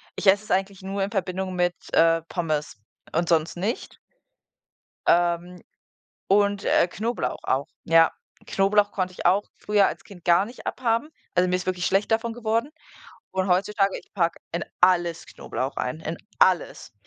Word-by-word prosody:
ich - - -5
esse 195 +1 +5
es - - -15
eigentlich 195 +1 0
nur 195 +1 -2
in 195 - -3
Verbindung 190 -2 -2
mit, 175 0 +1 0.2
äh, 165 0 +4
Pommes 155 - -3 0.4
und 170 +1 0
sonst 165 -1 +2
nicht. 205 +8 -3 1.1
Ähm, 175 +1 +2 0.7
und, 200 0 +3
äh, 175 - +4
Knoblauch 225 +6 -3
auch, 140 +3 0 0.2
ja. 165 0 +5 0.4
Knoblauch 205 +1 +2
konnte 185 -1 -2
ich - - -9
auch 195 +3 +3
früher 205 -1 +2
als - - -5
Kind 180 -4 -15
gar 175 +3 +5
nicht 240 +4 -12
abhaben, 235 +3 0 0.3
also 180 +1 +4
mir 180 - +1
ist 180 - -3
wirklich 180 -1 -1
schlecht 195 +3 +1
davon 225 +1 +1
geworden, 230 +4 -1 0.6
und 190 0 -1
heutzutage, 195 +2 +1
ich - - -18
packe 170 -4 0
in 170 -1 -2 0.2
alles 175 -2 +3
Knoblauch 130 +2 -5
rein, 125 +5 -3
in 160 +1 -4 0.2
alles. 180 -9 +2
185 Hz, 160 wpm, -25 LUFS, 170-205 Hz, 1.1 s, esse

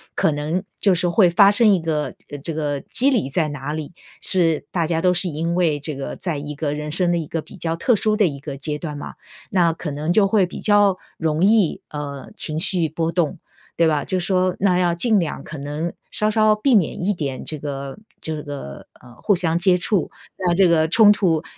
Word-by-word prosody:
可 - - +2
能 155 +5 -2 0.2
就 195 - +3
是 175 +1 +1
会 180 0 +4
发 195 +3 +6
生 210 0 +4
一 185 - +2
个 155 -2 -2 0.2
呃， 145 - -6
这 160 +4 -5
个 145 -2 -2
机 260 +3 +2
理 225 - 0
在 155 +2 0
哪 145 +1 -5
里， 155 +1 -6 0.3
是 165 -5 +1
大 170 -3 0
家 165 -1 0
都 180 0 +3
是 180 +1 +3
因 165 +2 -2
为 165 -5 +1
这 150 +1 -4
个 135 - -5
在 170 -5 -3
一 145 +1 -6
个 145 0 -2
人 150 0 -5
生 175 +2 +1
的 175 - +1
一 160 -3 -4
个 165 - -3
比 - - -14
较 165 -2 -2
特 225 +8 +2
殊 215 +1 +1
的 210 - +4
一 140 -3 -5
个 140 0 -7
阶 150 +2 -3
段 150 -3 -5
嘛， - - -7 0.4
那 175 -3 +3
可 160 -2 -6
能 150 +4 -2
就 200 0 +4
会 195 -1 +3
比 180 - -8
较 205 -3 +4 0.2
容 160 +1 0
易， 205 -4 +3
呃， 140 -2 -7
情 155 0 0
绪 175 -2 +1
波 165 +2 -2
动。 175 0 -1 0.4
对 165 -1 +4
吧， 150 -2 0
就 185 - -1
说 185 0 +1
那 185 -3 +3
要 175 -1 +1
尽 215 +4 +3
量 165 -4 -3
可 160 - -8
能 150 +4 -4 0.2
稍 215 0 0
稍 215 -1 +4
避 245 +5 +1
免 180 -3 +1
一 205 - +1
点 140 -7 -4
这 155 -2 -4
个 140 0 -6 0.2
这 155 -1 -4
个， 140 - -8
呃， 120 -1 -16
互 200 - +3
相 170 -1 0
接 185 0 +4
触， 180 +2 0 0.3
那 180 -2 +1
这 190 +1 +5
个 160 -1 +3
冲 210 +4 +6
突 170 -6 +1
165 Hz, 245 characters per minute, -21 LUFS, 150-185 Hz, 0.4 s, 发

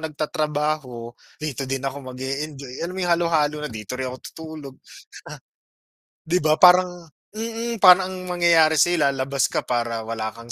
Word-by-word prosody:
nagtatrabaho, 150 -5 -3 0.2
dito 140 -3 -5
din 135 0 -3
ako 135 +1 -4
mag-e-enjoy 135 +1 -6
alam 180 +2 -4
mo - - -3
yung 175 - +2
halo-halo 160 -3 +1
na. 150 - -4
Dito 110 +3 -7
rin 130 - -2
ako 125 - -7 0.2
tutulog. 155 -4 -9
Ah. - - -17 1.3
'Di 175 +2 +2
ba 155 0 +4
parang 180 0 +5 0.3
mm, 230 +1 -4
parang 185 0 +8
ang - - -6
mangyayari 170 -3 +4
sa'yo 175 +2 +3
labas 135 0 0
ka - - -2
para 115 -2 -2
wala 110 -1 -3
kang 115 0 -10
150 Hz, 160 wpm, -23 LUFS, 130-170 Hz, 1.3 s, parang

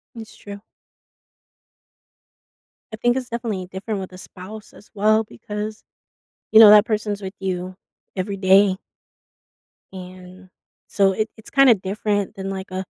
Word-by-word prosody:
It's 220 -2 -11
true. 200 0 -10 2.3
I - - -2
think 240 +3 +1
it's 255 -1 -5
definitely 225 -6 -4
different 195 +3 -5
with 190 -1 -8
a - - -10
spouse 205 +3 -11
as 205 - -18
well 215 +1 +2
because, 210 - -7 0.7
you 220 - +6
know, 215 - +10
that 210 0 +8
person's 210 -2 -2
with 190 +1 -7
you 185 -1 -4 0.4
every 195 +2 -3
day 190 0 +4 1.2
and 185 0 -12 0.4
so, 195 -1 +2
it 215 +3 -2
it's 220 - -14
kinda 275 -3 +6
different 205 +1 -3
than 195 0 -5
like 190 0 -6
a 185 0 -3
200 Hz, 140 wpm, -21 LUFS, 190-215 Hz, 2.3 s, know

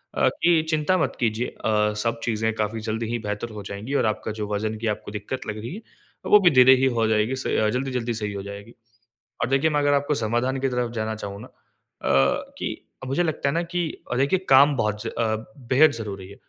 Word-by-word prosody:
अ, - - +3
कि 170 -1 +2
चिंता 155 +3 +2
मत 175 - 0
कीजिए 115 0 0 0.2
अ, 105 -1 +2
सब 115 0 -1
चीज़ें 110 -1 0
काफ़ी 110 +1 -2
जल्दी 110 +1 -2
ही 120 - -1
बेहतर 105 +3 -3
हो - - -7
जाएँगी 105 +7 -5
और - - +1
आपका 110 0 -1
जो 105 - -2
वज़न 110 +1 -2
की 115 - -2
आपको - - -11
दिक्कत 105 +5 -5
लग 105 0 -4
रही 115 +6 -6
है - - -7 0.5
अ, - - -3
वो 210 - +8
भी 185 -3 +5
धीरे 130 +1 +8
ही - - +5
हो 110 - +3
जाएगी 110 +3 +1
स 130 - -3 0.3
जल्दी-जल्दी 125 -2 -2
सही 105 -2 -3
हो 100 -1 -5
जाएगी। 100 +3 -9 0.7
अब 115 - -1
देखिए 135 +4 +3
मैं 150 -1 +1
अगर 145 0 +3
आपको 145 +1 +1
समाधान 120 +4 0
की 135 - +1
तरफ़ 125 -2 -1
जाना 110 -1 -3
चाहूँ 100 -1 -7
ना - - -10
अ, - - -27 1.1
कि - - -3 0.3
मुझे 135 +7 +1
लगता 155 -4 -1
है - - -1
ना 170 - +1
कि, 175 +1 -2 0.3
अ, - - 0
देखिए 140 +8 +2
काम 140 +2 +7
बहुत 105 -2 -1
ज - - -4
अ, 110 -1 -1 0.3
बेहद 150 +4 +6
ज़रूरी 100 -4 -6
है, 100 - -11
115 Hz, 230 wpm, -24 LUFS, 110-135 Hz, 1.1 s, वो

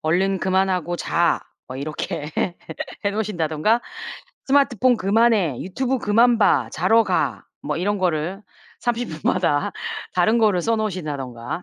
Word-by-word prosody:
"얼른 190 +5 +1
그만하고 185 -2 +1
자." 170 0 +1 0.3
뭐 130 - -6
이렇게 150 +2 -4 0.7
해 200 - +2
놓으신다든가 205 0 0 0.6
"스마트폰 260 -3 +3
그만해, 205 - +2
유튜브 260 +8 -1
그만 235 +1 +3
봐. 140 - +3
자러 220 +8 +4
가." - - -1 0.2
뭐 - - -2
이런 205 +2 0
거를 180 +2 -1 0.4
30 235 -10 -1
마다 145 0 0 0.4
다른 200 +6 +3
거를 205 -6 +3
써 230 0 +1
놓으신다든가. 150 - -4
190 Hz, 270 characters per minute, -22 LUFS, 160-225 Hz, 0.7 s, 자러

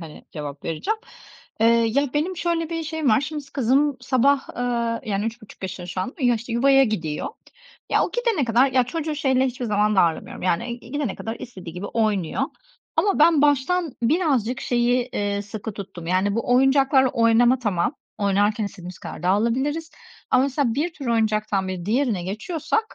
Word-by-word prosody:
hani, 160 -3 -11
cevap 145 -2 -7
vereceğim. 405 - -2 0.6
Eee, 225 - +5
ya 235 +4 +3
benim 345 +5 0
şöyle 335 -1 -1
bir 330 -1 -2
şeyim 315 -2 -2
var; 215 +2 +5
şimdi 295 +1 -5
kızım 275 +2 +2
sabah, 265 +2 +2
ııı, 235 -2 -1
yani 205 -1 -1
3,5 225 -3 -7
yaşında 185 -1 -5
şu 180 +1 -4
anda 190 +7 -4
ama 255 - +1
ya, 240 - +4
işte, 230 +1 -5
yuvaya 270 +3 +5
gidiyor. 165 -9 -2 0.6
Ya, - - +3
o - - -4
gidene 470 - +1
kadar, 245 +3 +3
ya 255 -1 +4
çocuğu 310 +4 -3
şeyle 265 -2 +2
hiçbir 250 -1 -4
zaman 210 -1 +1
darlamıyorum, 170 -3 +1
yani. 210 +7 -1
Gidene 265 -3 -3
kadar 225 +1 -5
istediği 185 -8 -9
gibi 180 +3 -5
oynuyor. 210 -7 0 0.5
Ama 400 -5 +2
ben 310 -1 +5
baştan 295 +3 +2
birazcık 265 - +1
şeyi, 245 0 +1
eee, 205 0 -1
sıkı 210 +1 -6
tuttum. 195 -4 -8
Yani, 190 +3 +1
bu 230 +2 0
oyuncaklarla 270 0 +4
oynama, 235 +2 +4
tamam, 210 - 0 0.2
oynarken 205 +2 +1
istediğimiz 185 -3 -8
kadar - - -8
dağılabiliriz 255 - 0 0.4
ama, 255 - +5
mesela, 270 -3 0
bir 320 +6 -1
tür 280 -5 -8
oyuncaktan 215 -4 +1
bir 180 -2 -4
diğerine 225 -4 +1
geçiyorsak, 325 - -2
240 Hz, 170 wpm, -23 LUFS, 205-280 Hz, 0.6 s, Eee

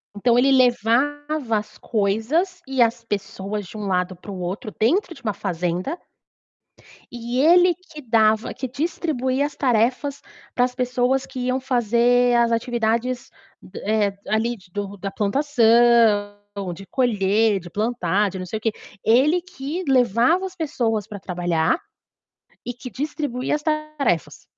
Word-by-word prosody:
Então 235 +3 +2
ele 270 +3 +4
levava 260 +1 +2
as 210 0 -7
coisas 240 - 0
e 265 -2 +3
as 230 0 -1
pessoas 205 -1 -4
de 180 - -13
um 210 -1 -4
lado 180 0 0
para 180 - -13
o 190 - -6
outro, 185 +4 -5
dentro 340 - +2
de 275 -4 -16
uma 215 -3 -1
fazenda 180 - -2 1.1
E 240 +1 -3
ele 350 +4 +6
que 345 -4 -13
dava 220 -3 +2
que 260 - -5
distribuía 280 -1 -1
as 295 - -6
tarefas 255 +3 +1 0.3
para 245 - +4
as 250 0 -6
pessoas 250 +1 0
que 265 -1 -8
iam 255 +1 +1
fazer 245 -1 +2
as 235 -1 +3
atividades 235 +1 -1 0.3
d - - -10
eh, 205 -2 +1
ali, 230 +3 0
do 200 +1 -5
da 195 +1 -5
plantação 230 -3 +3 0.4
de 195 - -11
colher, 215 -3 +2
de 175 -1 -11
plantar, 205 -1 0
de 190 - -7
não 185 - -5
sei 200 +5 -4
o - - -31
quê. 225 - +1 0.3
Ele 280 +10 +4
que 345 -1 -6
levava 255 - +3
as 380 -1 -7
pessoas 235 - -1
para 210 -2 -8
trabalhar 175 - 0 0.9
e 245 - -3
que 245 +1 -9
distribuía 275 +1 -2
as 300 - -5
tarefas. 305 - -1
235 Hz, 150 wpm, -22 LUFS, 210-270 Hz, 1.1 s, ele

